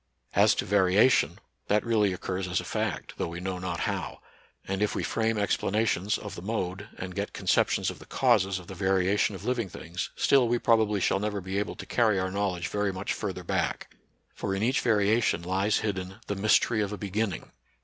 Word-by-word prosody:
As - - +5
to - - -1
variation, 100 +5 +4 0.3
that 105 +2 +2
really 110 -4 +2
occurs 90 0 -3
as 90 - 0
a - - -5
fact, - - -3
though - - -1
we 85 +1 -6
know 90 0 -3
not 90 -2 -3
how; - - -3 0.5
and, 95 +1 -2
if 105 - +1
we - - -1
frame 115 -1 0
explanations 105 0 +1
of 105 - -8
the - - -7
mode 100 -1 -3
and 90 0 -6
get 100 +1 -3
conceptions - - +1
of - - -11
the - - -14
causes 105 -7 +2
of 90 - -9
the 95 - -8
variation 95 +2 +1
of 95 +2 -9
living 120 -5 -1
things, 85 +2 -5
still 135 -3 +4
we 120 +1 +2
proba 115 -2 +3
bly 105 0 -1
shall 95 0 +1
never 105 0 -2
be 95 +1 -3
able 105 - -3
to - - -8
carry 110 -4 +2
our 95 0 -1
knowledge 95 -3 -1
very 105 -1 -1
much 95 +1 -3
further - - -4
back; - - -2 0.4
for 95 -1 -3
in 100 - -1
each 125 +3 +2
variation 110 -4 +2
lies 95 +4 +1
hidden 95 -2 -3
the - - -2
mystery 110 +2 +3
of 100 -1 -1
a 105 - -4
beginning. 100 -1 -3
100 Hz, 205 wpm, -28 LUFS, 95-110 Hz, 0.5 s, As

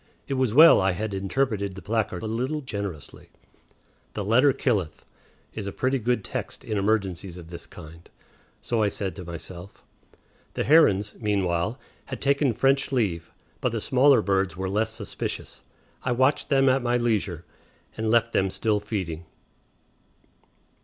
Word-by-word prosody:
It - - -2
was 130 -4 +1
well 155 +3 +8
I 95 0 +2
had 105 +3 -4
interpreted 100 0 -1
the 95 - -8
placard 110 -4 -2
a - - -3
little 125 +7 -2
generously. 100 - -7 0.8
"The 105 - -3
letter 125 +7 +5
killeth" 100 - -1 0.5
is 105 -3 -5
a - - -3
pretty 130 +6 0
good 120 -2 0
text - - -5
in 110 - -3
emergencies 100 -3 -1
of 85 -1 -11
this 85 - -8
kind. 80 +2 -13 0.5
So 115 -2 -1
I 105 - +3
said 95 -3 -4
to 90 - -8
myself. 85 +2 -9 0.7
The - - 0
herons, 105 -10 +4
meanwhile, 100 +1 0 0.3
had - - -6
taken 140 -1 +2
French 135 +3 +2
leave, 95 -10 -1 0.3
but 125 - -1
the 115 - -1
smaller 130 +1 +4
birds 95 -1 0
were 95 0 -3
less 110 +3 0
suspicious; 110 -5 -6 0.4
I 125 - 0
watched 130 +4 +1
them 135 -2 +4
at 130 +1 +3
my 120 0 +1
leisure, 105 -8 -1 0.5
and 110 0 -2
left 115 0 +2
them 95 0 +2
still 105 +2 0
feeding. 95 -6 -4
105 Hz, 155 wpm, -25 LUFS, 95-125 Hz, 0.8 s, well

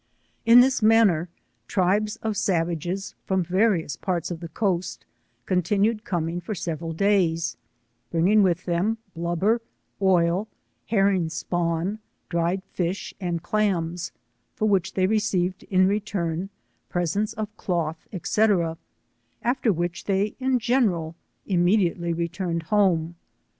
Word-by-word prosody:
Tn 235 +2 +9
this 260 0 +2
manner 215 -7 +4 0.4
tribes 205 +4 +1
of 220 -1 -1
savages 175 +1 -1
from 190 -1 +1
various 185 -3 +1
parts 180 -3 -2
of 170 - -4
the 170 - -6
coast, 180 0 -2 0.4
continued 205 +5 +1
coming 175 -1 -2
for 215 - -4
several 165 -2 -4
days, 170 -2 +1 0.5
bringing 185 +6 +4
with 180 -2 +1
them, 185 +6 0 0.2
blubber, 175 +7 +1 0.4
oil, 185 +1 +3 0.4
herring 195 -5 +2
spawn, 170 +4 -1 0.3
dried 170 +2 0
fish 180 +2 -3
and 175 -2 -2
clams, 175 -4 -1 0.4
for 215 - -1
which 195 -4 +1
they 185 - +3
re 215 +3 +2
ceived, 185 -3 -1
in 185 -1 +4
return, 195 -3 -2 0.4
presents 175 +5 -1
of 215 0 -5
cloth, 165 -5 -2 0.2
&c, 220 - +3 1.0
after 240 -1 +2
which 175 -1 -3
they 200 +1 +1
in 260 -1 +2
general 210 -10 +1 0.3
immediately 175 -2 +2
returned 170 0 -2
home. 170 -4 +1
185 Hz, 120 wpm, -25 LUFS, 170-210 Hz, 1.0 s, Tn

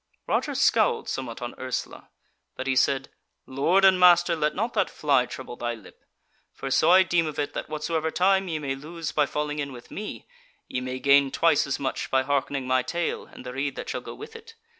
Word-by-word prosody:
Roger - - -1
scowled - - +2
somewhat 125 -3 -5
on 120 - -5
Ursula; 130 -1 -5 0.5
but 130 - -5
he 135 -1 0
said: 135 +1 +2 0.4
"Lord 165 +9 +2
and 190 -1 +6
master, 175 -1 +6
let 155 -1 0
not 225 +5 -2
that - - +1
fly 140 -4 +2
trouble 120 - -8
thy 120 0 -3
lip. 110 - -17 0.5
For 135 - -5
so 155 - +4
I 185 +2 +7
deem 170 -3 +1
of 155 - -6
it, 145 0 -2
that - - -5
whatsoever 155 +1 -2
time 190 +3 +2
ye 160 -3 -2
may 140 -3 -3
lose 155 +4 -6
by 150 -2 +2
falling 150 0 -3
in 140 -1 -3
with 120 -2 -12
me, 210 +1 -7 0.4
ye 125 - -3
may 130 0 -4
gain 140 +1 +4
twice 160 0 +2
as 140 - -1
much 135 -2 -2
again - - -13
by 130 0 +4
hearkening 140 -1 -1
my 130 0 +2
tale 170 +6 -3
and - - -13
the 125 - -6
rede 140 +1 -2
that - - -6
shall - - -3
go - - -9
with 445 +1 -10
it. 455 0 -12
145 Hz, 220 wpm, -26 LUFS, 130-170 Hz, 0.5 s, I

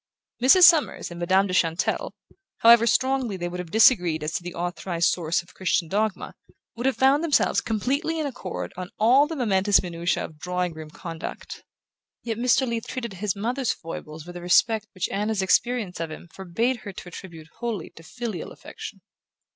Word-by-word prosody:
Mrs. 270 +9 +6
Summers 325 - +5
and 170 - -8
Madame 190 +3 +3
de 185 - -4
Chantelle, 165 -1 0 0.5
however 230 0 +7
strongly 260 -5 +1
they 175 -1 -3
would 180 +1 -6
have 180 -2 -6
disagreed 180 - +4
as 155 +2 -3
to - - -2
the 175 0 -8
authorized 175 0 -1
source 170 0 -1
of 175 - -20
Christian 170 -2 0
dogma, 210 +3 -2 0.4
would 240 +3 -1
have 265 - 0
found 275 +4 +4
themselves 320 -4 +2
completely 280 +9 -1
in 310 - -1
accord 90 - -5
on 185 0 -6
all 255 +7 +5
the 325 - -5
momentous 205 -7 +2
minutiae 170 0 -2
of 155 -1 -13
drawing 180 0 -2
room 155 -1 -9
conduct; 165 +1 -8 0.6
yet 230 -1 -3
Mr. 255 +2 +3
Leath 230 -1 -3
treated 235 -5 -5
his 195 +1 -2
mother's 245 +5 -1
foibles 160 -1 -9
with 175 0 -10
a 175 - -7
respect 215 +5 +3
which 185 - -1
Anna's 210 0 -1
experience 205 0 +1
of 165 -1 -3
him 155 - -10
forbade 225 +7 -1
her 210 -3 -8
to 180 - -9
attribute 165 -3 -11
wholly 235 -4 -4
to - - -15
filial 220 +1 -6
affection. - - -10
195 Hz, 180 wpm, -25 LUFS, 175-240 Hz, 0.6 s, however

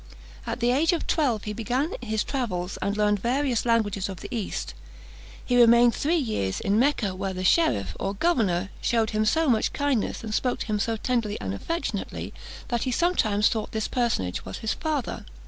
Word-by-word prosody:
At - - -3
the 240 +1 +3
age 315 +7 +3
of 335 - -2
twelve 250 -10 +1
he 210 - -4
began 250 - -1
his 220 -3 -1
travels, 195 -9 -3
and 200 +1 -1
learned 210 -1 +2
the - - -17
various 250 0 0
languages 205 -4 +1
of 190 -3 -7
the 255 - -6
East. 220 -4 -3 0.7
He 245 -1 +4
remained 235 0 +6
three 320 +9 +1
years 215 - -1
in 200 +2 +1
Mecca, 245 -7 +2
where 190 0 -3
the 185 - -3
cherif, 180 - +2
or 195 +1 -2
governor, 200 - +1
shewed 225 -2 +1
him 215 0 +1
so 320 +9 +2
much 230 -5 +2
kindness, 285 -8 -1
and 220 -1 -4
spoke 250 +2 0
to - - -2
him 215 -2 -1
so 225 +2 0
tenderly 230 -3 -1
and 95 -1 -3
affectionately, 335 - -4 0.4
that 240 -3 0
he 260 - -1
sometimes 220 - +2
thought 220 +2 -2
that 220 -1 -2
personage 230 - 0
was 95 - -6
his 220 - -1
father. 305 -6 -3
225 Hz, 195 wpm, -26 LUFS, 205-255 Hz, 0.7 s, remained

